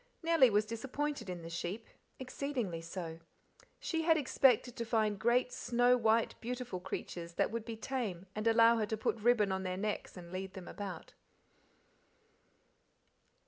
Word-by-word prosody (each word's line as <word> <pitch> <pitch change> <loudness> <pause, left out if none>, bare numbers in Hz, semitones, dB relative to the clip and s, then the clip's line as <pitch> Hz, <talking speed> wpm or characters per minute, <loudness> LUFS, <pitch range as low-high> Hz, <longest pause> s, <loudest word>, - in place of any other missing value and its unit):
Nellie 325 -6 +6
was 210 0 +2
disappointed 255 +1 -3
in 175 -2 -5
the 165 - -7
sheep, 185 +6 -4 0.3
exceedingly 255 - -3
so. 165 -1 -6 0.6
She 325 -1 -1
had 325 0 +4
expected 255 -4 +3
to 235 - -1
find 220 -3 +1
great 240 +3 +2
snow 245 +1 +3
white 225 -1 +2
beautiful 245 -5 -4
creatures 170 -1 -6
that - - +1
would 230 -1 -3
be 230 - -5
tame 215 -7 -3
and 215 +2 -2
allow 230 +1 +6
her 215 -2 0
to 220 - -2
put 220 - -1
ribbon 215 -3 +3
on 190 0 -1
their 185 -1 -3
necks 210 -1 -3
and 170 -1 -10
lead 190 +1 -5
them 185 -2 -8
about. 190 -5 -7
220 Hz, 155 wpm, -34 LUFS, 190-245 Hz, 0.6 s, Nellie